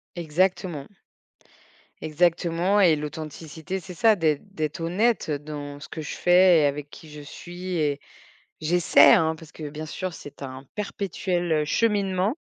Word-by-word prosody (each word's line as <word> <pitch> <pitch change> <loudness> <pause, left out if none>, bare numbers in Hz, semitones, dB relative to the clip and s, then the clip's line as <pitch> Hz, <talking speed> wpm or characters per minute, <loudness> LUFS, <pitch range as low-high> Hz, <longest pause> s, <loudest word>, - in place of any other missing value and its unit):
Exactement 175 -2 -1 1.2
exactement 170 +4 +1
et 170 -5 +5
l'authenticité 155 +3 -6
c'est 180 +1 -10
ça, 220 +5 +4
d'être 155 -5 +1
d'être 155 +1 -3
honnête, 200 +7 +1
heu, 150 - 0
dans 145 -1 -8
ce 150 - -10
que 160 - -7
je 150 - -6
fais 180 -1 +5
et - - +3
avec 145 0 -2
qui 155 +1 -13
je 150 0 -9
suis 175 +5 -7
et 145 -2 0 0.6
j'essaie, 170 +2 +5
hein, 160 0 +2
parce 160 -1 -14
que 150 -2 -7
bien 155 +2 -7
sûr 185 +3 -4
c'est 145 -3 -11
un 130 0 -7
perpétuel, 185 -4 -3
heu, - - -1
cheminement. 200 - +1
165 Hz, 155 wpm, -25 LUFS, 150-185 Hz, 1.2 s, et